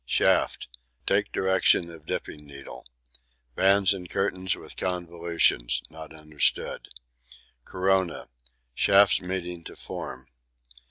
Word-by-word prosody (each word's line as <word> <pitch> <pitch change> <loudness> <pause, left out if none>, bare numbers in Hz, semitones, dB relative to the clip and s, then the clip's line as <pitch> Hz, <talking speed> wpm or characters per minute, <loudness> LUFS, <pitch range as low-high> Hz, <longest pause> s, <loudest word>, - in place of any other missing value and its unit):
Shafts: - - +1 0.4
take - - +1
direction 95 -2 +2
of 80 -2 -14
dipping 75 - -5
needle. 70 -4 -11 0.7
Bands 95 +5 +4
and 90 -2 -8
Curtains 95 -2 -1
with - - -11
convolutions 85 -8 0
not 80 -1 -10
understood. 75 -2 -1 0.8
Corona: 95 -2 0 0.5
shafts 100 +7 +5
meeting 90 -2 -4
to - - -9
form. 65 0 -7
85 Hz, 100 wpm, -26 LUFS, 75-95 Hz, 0.8 s, shafts